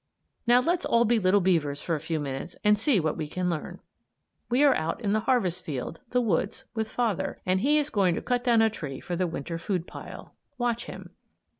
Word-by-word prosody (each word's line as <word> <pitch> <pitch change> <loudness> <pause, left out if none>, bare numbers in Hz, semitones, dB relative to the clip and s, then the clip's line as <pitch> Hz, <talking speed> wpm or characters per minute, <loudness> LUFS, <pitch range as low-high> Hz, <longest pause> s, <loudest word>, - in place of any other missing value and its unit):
Now 245 +1 +6
let's 345 +6 0
all 235 0 +3
be 235 0 +3
little 195 +1 +3
beavers 160 -6 +1
for 165 - -2
a 155 - 0
few 160 +1 -2
minutes 140 +3 -5
and 210 -1 +5
see 225 -2 +3
what 155 -2 0
we 155 -2 -3
can 180 +3 -1
learn. 160 - -5 0.7
We 250 +4 +3
are 285 -2 +6
out 165 +6 -2
in 205 -3 0
the 215 - +3
harvest 185 -9 +1
field 145 +2 -5
the 250 0 +2
woods 215 +3 -1
with 220 -2 -2
father, 205 -6 -1
and 185 +1 +2
he's 295 +3 +2
going 185 -5 +2
to - - -3
cut 245 -1 0
down 235 -3 +4
a 220 - +4
tree 140 - -6
for 175 - -4
the 180 +1 0
Winter 165 +1 -5
food 180 -1 -2
pile. - - -10 0.2
Watch 240 -1 -1
him. - - -9
195 Hz, 215 wpm, -27 LUFS, 165-240 Hz, 0.7 s, Now